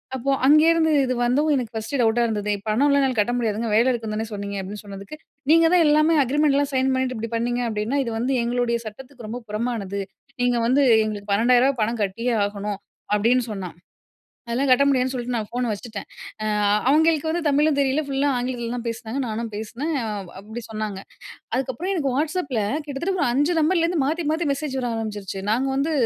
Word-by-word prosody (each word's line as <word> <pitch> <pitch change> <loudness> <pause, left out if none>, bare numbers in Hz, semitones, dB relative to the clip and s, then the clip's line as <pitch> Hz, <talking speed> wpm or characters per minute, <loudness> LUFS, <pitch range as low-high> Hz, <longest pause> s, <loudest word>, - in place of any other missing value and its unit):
அப்போ 270 +2 -1
அங்கேந்து 320 +2 +5
இது 255 - 0
வந்தும் 285 +6 +2
எனக்கு 240 -4 -3
ஃபர்ஸ்ட்டு 220 +6 -3
டவுட்டா 230 +1 +3
இருந்தது. 210 -2 -1 0.2
"பணம்லாம் 280 +6 +3
என்னால 260 -3 0
கட்ட 210 +4 +2
முடியாதுங்க. 225 -1 -1
வேலை 230 +4 +4
இருக்குன்னு 225 -3 -3
தானே 220 +1 -3
சொன்னீங்க." 200 -1 -5
அப்படீன்னு 200 +3 -7
சொன்னதுக்கு. 200 +6 -9 0.4
"நீங்க 330 0 +6
தான் 350 - +6
எல்லாமே 305 +2 +4
அக்ரீமெண்ட்லாம் 285 +1 +1
சைன் 260 0 +2
பண்ணிட்டு 260 -1 -1
இப்படி 230 +1 -5
பண்ணீங்க 240 +1 -1
அப்படின்னா, 215 +5 -1
இது 230 - -3
வந்து 250 +4 0
எங்களுடைய 240 0 0
சட்டத்துக்கு 245 +2 -10
ரொம்ப 240 +3 -5
புறமானது. 210 -3 -3 0.4
நீங்க 245 -1 +2
வந்து 275 +3 +3 0.2
எங்களுக்கு 205 -1 -5
ரூ.12,000 245 +5 +4
ரூபாய் 245 -5 -5
பணம் 230 0 -2
கட்டியே 230 +5 -1
ஆகணும்." 205 0 -4 0.4
அப்படின்னு 235 +4 +2
சொன்னா, 190 -4 -5 0.8
அதெல்லாம் 255 +4 0
கட்ட 255 +2 +5
முடியாதுன்னு 260 -1 +1
சொல்லிட்டு 250 -1 -3
நான் 215 -2 -2
ஃபோன 245 0 -2
வச்சுட்டேன். 210 0 -6 0.4
ஆ - - -2 0.4
அவங்களுக்கு 315 +1 +3
வந்து 345 +2 -1
தமிழும் 295 +1 +3
தெரியல 275 +2 +2
ஃபுல்லா 275 +1 +1
ஆங்கிலத்தில 245 -1 -3
தான் 240 -1 -5
பேசினாங்க. 230 +2 -4
நானும் 225 0 -3
பேசினே, 225 +8 -5 0.5
அப்படி 220 +4 -8
சொன்னாங்க. 215 -3 -4 0.5
அதுக்கப்புறம் 265 +9 -2
எனக்கு 290 -7 0
வாட்ஸ்அப்பில 295 -5 -1 0.2
கிட்டத்தட்ட 295 +7 -2
ஒரு - - +2
5 290 +6 +2
நம்பர்லருந்து 335 +1 +2
மாத்தி 320 +4 -1
மாத்தி 320 +1 -1
மெசேஜ் 280 -1 -3
வர 245 - -2
ஆரம்பிச்சுருச்சு. 205 -3 -5
"நாங்க 250 +5 +1
வந்து 280 +4 0
245 Hz, 175 wpm, -23 LUFS, 220-280 Hz, 0.8 s, நீங்க